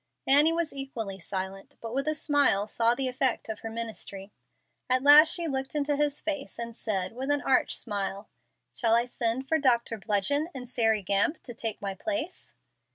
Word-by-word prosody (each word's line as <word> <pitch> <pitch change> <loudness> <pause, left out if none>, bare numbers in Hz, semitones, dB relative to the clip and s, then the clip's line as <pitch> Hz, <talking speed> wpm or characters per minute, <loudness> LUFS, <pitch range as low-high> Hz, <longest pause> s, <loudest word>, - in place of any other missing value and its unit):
Annie 290 +4 +6
was 335 -1 -1
equally 235 -8 -5
silent, 190 +2 -6
but 230 0 -7
with 275 +3 -1
a 310 - +1
smile 285 -9 +2
saw 230 +2 +1
the 270 0 -1
effects 255 -2 0
of 220 - -4
her 225 - -6
ministry. 220 -3 -6 0.6
At 255 +1 +3
last 300 +3 +9
she 340 -2 -1
looked 270 0 -3
into 290 0 +1
his 290 0 0
face, 295 -3 -4
and 235 -1 -6
said, 195 -5 -2
with 260 +3 -5
an 290 0 +1
arch 265 - +2
smile, 200 -2 -3 0.5
"Shall 230 -2 +3
I 235 +1 +3
send 245 +1 -2
for 320 +2 +2
Doctor 235 -5 +1
Bludgeon 225 - 0
and 250 -1 -6
Sairy 225 -4 +1
Gamp 200 - 0
to 240 - -8
take 225 -3 -5
my 195 -1 -2
place?" 315 - -4
245 Hz, 185 wpm, -28 LUFS, 215-285 Hz, 0.6 s, last